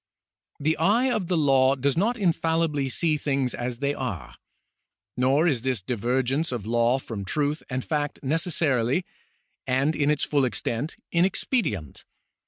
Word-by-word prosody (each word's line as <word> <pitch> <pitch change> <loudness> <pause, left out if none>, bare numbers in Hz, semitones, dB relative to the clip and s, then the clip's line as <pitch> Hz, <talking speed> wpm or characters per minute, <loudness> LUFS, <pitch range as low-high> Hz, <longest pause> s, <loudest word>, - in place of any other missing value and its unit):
The 155 +3 +1
eye 225 +10 +3
of 210 -7 -1
the 180 -1 +1
law 135 -3 +4
does 135 +1 0
not 225 +8 +1
infallibly 165 -6 +1
see 155 +4 +1
things 135 -3 -1
as 120 0 -4
they 140 +2 0
are. 125 - -5 0.8
Nor 135 +6 +3
is 135 -8 +1
this 130 -2 -1
divergence 125 - -1
of 120 -5 -4
law 120 +2 +2
from 115 -6 -6
truth 145 +8 -1
and 125 0 -3
fact 150 -2 -2
necessarily, 150 -1 +1 0.6
and 135 +4 +1
in 145 -1 +1
its 150 -1 +1
full 145 -2 +1
extent, 125 +3 -2
inexpedient. 170 - 0
140 Hz, 145 wpm, -25 LUFS, 125-160 Hz, 0.8 s, law